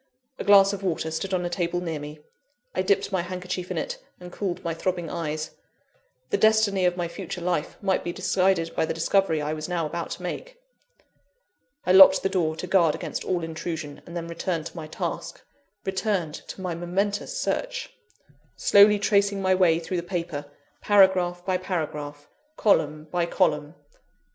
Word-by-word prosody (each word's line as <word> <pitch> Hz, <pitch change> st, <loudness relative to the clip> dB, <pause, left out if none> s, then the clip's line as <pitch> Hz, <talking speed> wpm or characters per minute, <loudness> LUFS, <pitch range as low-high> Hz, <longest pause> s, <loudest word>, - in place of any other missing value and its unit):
A -, -, -2 dB
glass 200 Hz, -1 st, +6 dB
of 200 Hz, -, -5 dB
water 165 Hz, -4 st, -2 dB
stood 175 Hz, +5 st, -3 dB
on 180 Hz, -1 st, 0 dB
a -, -, -1 dB
table 175 Hz, -1 st, -1 dB
near 165 Hz, -4 st, -3 dB
me 150 Hz, +1 st, -9 dB, 0.5 s
I 185 Hz, -, 0 dB
dipped 190 Hz, +1 st, +1 dB
my 190 Hz, -2 st, +1 dB
handkerchief 180 Hz, 0 st, -5 dB
in -, -, -3 dB
it, -, -, -3 dB, 0.2 s
and 180 Hz, 0 st, -10 dB
cooled 190 Hz, -3 st, -3 dB
my 170 Hz, -, -1 dB
throbbing 175 Hz, 0 st, -2 dB
eyes. 155 Hz, -2 st, -3 dB, 0.8 s
The -, -, +1 dB
destiny 220 Hz, -3 st, +4 dB
of 180 Hz, 0 st, +1 dB
my 175 Hz, -1 st, -1 dB
future 180 Hz, +1 st, -6 dB
life 175 Hz, -3 st, -2 dB
might 190 Hz, -1 st, +1 dB
be 175 Hz, -, -2 dB
decided 185 Hz, -2 st, +1 dB
by 160 Hz, -, +1 dB
the -, -, -2 dB
discovery 165 Hz, -2 st, +1 dB
I 150 Hz, +1 st, -1 dB
was 155 Hz, +2 st, -5 dB
now 170 Hz, -2 st, -1 dB
about 170 Hz, +2 st, -4 dB
to -, -, -13 dB
make! -, -, -6 dB, 1.3 s
I 180 Hz, -, +2 dB
locked 190 Hz, 0 st, +8 dB
the 195 Hz, -, +2 dB
door 160 Hz, -5 st, 0 dB
to 160 Hz, -, -5 dB
guard 175 Hz, -4 st, +3 dB
against -, -, -5 dB
all 180 Hz, -2 st, -1 dB
intrusion, 160 Hz, -2 st, -5 dB
and 170 Hz, 0 st, -6 dB
then 170 Hz, -1 st, -4 dB
returned 170 Hz, -1 st, -3 dB
to -, -, -8 dB
my 160 Hz, -2 st, -6 dB
task 155 Hz, -, -5 dB, 0.5 s
returned 190 Hz, -4 st, -1 dB
to -, -, -8 dB
my 180 Hz, -2 st, -2 dB
momentous 195 Hz, -, -2 dB
search -, -, -2 dB, 0.6 s
slowly 205 Hz, +1 st, +6 dB
tracing 200 Hz, -1 st, +2 dB
my 190 Hz, -1 st, +2 dB
way 180 Hz, -3 st, +4 dB
through 170 Hz, +2 st, -3 dB
the -, -, 0 dB
paper, 170 Hz, -4 st, -4 dB, 0.4 s
paragraph 185 Hz, -3 st, +4 dB
by 185 Hz, -1 st, +1 dB
paragraph, 150 Hz, -5 st, -4 dB, 0.3 s
column 155 Hz, -7 st, +2 dB
by 175 Hz, -1 st, 0 dB
column. 155 Hz, -4 st, 0 dB
180 Hz, 175 wpm, -25 LUFS, 165-190 Hz, 1.3 s, locked